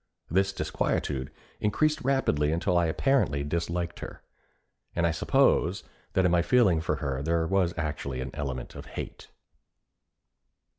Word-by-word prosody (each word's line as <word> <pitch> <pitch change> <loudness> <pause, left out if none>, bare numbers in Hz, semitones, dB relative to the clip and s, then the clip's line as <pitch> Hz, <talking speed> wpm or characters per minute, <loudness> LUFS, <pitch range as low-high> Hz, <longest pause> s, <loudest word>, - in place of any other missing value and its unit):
This 95 +3 +3
disquietude 75 -5 -1 0.3
increased 150 +9 +1
rapidly 125 - +1
until 85 +3 +1
I 85 -1 +3
apparently 80 - +1
disliked 85 +3 -2
her; - - -8 0.7
and 85 - +2
I 85 - +3
suppose 80 - +2 0.3
that 95 - +3
in 90 - +4
my 85 -1 +4
feeling 95 -5 +4
for 80 - 0
her 70 -2 -3
there 80 +2 +1
was 90 -1 +1
actually 75 -5 -3
an 65 0 -4
element 65 -4 -4
of - - -9
hate. - - -7
85 Hz, 140 wpm, -28 LUFS, 75-95 Hz, 0.7 s, in